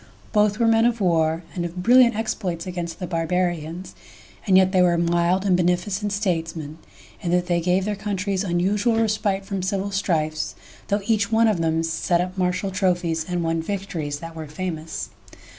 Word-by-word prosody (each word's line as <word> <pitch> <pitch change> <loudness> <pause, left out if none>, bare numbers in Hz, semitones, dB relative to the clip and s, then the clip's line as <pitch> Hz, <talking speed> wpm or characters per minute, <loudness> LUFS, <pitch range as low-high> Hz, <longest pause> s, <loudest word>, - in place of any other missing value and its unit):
Both 210 -1 +3
were 235 - +2
men 225 0 +4
of 235 -1 +1
war, 165 -3 +1
and 175 - -3
of 175 +1 -5
brilliant 245 0 +6
exploits 205 -6 -3
against 175 -2 -5
the 180 - -4
Barbarians, 175 0 -2 0.5
and 190 -1 +6
yet 190 0 +4
they 185 -2 +3
were 175 -1 +4
mild 170 +3 +1
and 190 -2 +4
beneficent 180 +4 0
statesmen, 165 -6 -2 0.4
in 175 - -3
that 180 0 +2
they 175 -1 +1
gave 180 +2 +1
their 210 0 -1
coun 205 0 -3
tries 195 0 -1
unusual 200 +5 +1
respite 205 -3 0
from 195 -1 -3
civil 195 +2 -2
strifes, 155 -5 -1 0.3
though 205 0 0
each 215 -1 +1
one 225 +1 +4
of 205 -6 +1
them 160 0 +1
set 165 +2 0
up 180 +1 -2
martial 185 +1 -1
trophies 175 -4 0
and 175 -1 -1
won 165 0 0
victories 170 -6 -4
that 165 0 -8
were 160 -1 -6
famous. 160 0 -5
180 Hz, 180 wpm, -23 LUFS, 170-200 Hz, 0.5 s, brilliant